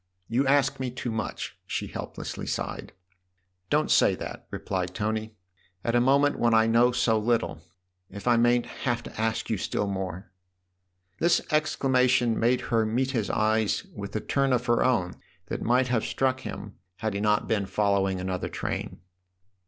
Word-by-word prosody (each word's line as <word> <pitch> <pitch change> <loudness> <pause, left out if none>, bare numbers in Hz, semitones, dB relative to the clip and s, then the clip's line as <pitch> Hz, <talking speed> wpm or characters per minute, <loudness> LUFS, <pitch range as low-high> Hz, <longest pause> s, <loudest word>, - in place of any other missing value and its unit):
" 90 - -47
You 135 +2 +3
ask 140 -1 +3
me 130 -1 -2
too 125 -1 -4
much! 110 -2 -4
" - - -48
she - - -2
helplessly - - -6
sighed. - - -4 0.4
" 90 0 -48
Don't - - +2
say - - +5
that/' - - -7
replied 90 -1 -3
Tony, 110 +1 -2 0.2
" 90 0 -37
at 115 - +1
a 120 - +4
moment 140 +3 +3
when 115 -1 +3
I 110 0 +5
know 115 +2 +4
so 120 -3 +2
little 115 -7 0 0.5
if 100 +4 -8
I 120 - +5
mayn't 120 +1 +3
have 120 -3 -3
to - - -7
ask 110 0 -1
you 110 - 0
still 105 - -1
more! 95 -1 -4 0.4
" 90 +1 -44
This 170 +1 +4
exclamation 130 -5 +2
made 120 +2 +2
her 115 -1 +4
meet 125 +5 0
his 115 -6 -1
eyes 110 0 +1
with 100 0 -7
a 110 - 0
turn 135 -1 +1
of 125 0 +1
her 120 -1 +3
own 90 -9 +1 0.3
that - - -3
might 125 +2 +2
have 120 -3 +1
struck 130 -1 0
him 105 -5 -7 0.2
had 110 +2 -3
he 100 - -2
not 105 0 +2
been 100 -3 0
following 95 -1 +1
another 95 0 -3
train. - - -4
110 Hz, 185 wpm, -27 LUFS, 100-125 Hz, 0.5 s, say